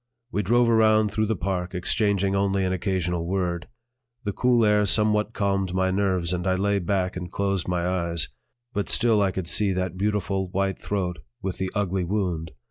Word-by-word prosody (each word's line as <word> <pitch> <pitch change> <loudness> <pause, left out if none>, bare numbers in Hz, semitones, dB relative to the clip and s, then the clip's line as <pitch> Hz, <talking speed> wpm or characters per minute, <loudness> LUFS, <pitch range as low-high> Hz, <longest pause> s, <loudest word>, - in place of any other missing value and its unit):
We 105 - 0
drove 120 +5 +3
around 110 -2 +4
through 110 +1 0
the 110 - 0
park, 90 0 -3
exchanging 100 +1 +1
only 100 -1 +1
an 95 - 0
occasional 90 -2 -1
word. 90 -2 -1 0.6
The 100 - -2
cool 120 -1 +3
air 105 -1 +3
somewhat 105 +1 +2
calmed 95 -3 0
my 95 0 +2
nerves 95 -3 0
and 90 +1 -2
I 95 - +3
lay 100 +1 +1
back 95 0 -1
and 90 -1 -6
closed 100 -3 -1
my 90 -1 0
eyes; 85 -3 -1 0.5
but 100 -2 -2
still 115 -3 +3
I 100 - +3
could 95 -2 -4
see 100 +1 +2
that 90 -1 -2
beautiful 100 -2 -1
white 95 +1 -1
throat 90 -5 -2 0.2
with 95 -2 -3
the 95 0 -1
ugly 95 -2 0
wound. 90 -4 -1
95 Hz, 185 wpm, -25 LUFS, 90-105 Hz, 0.6 s, around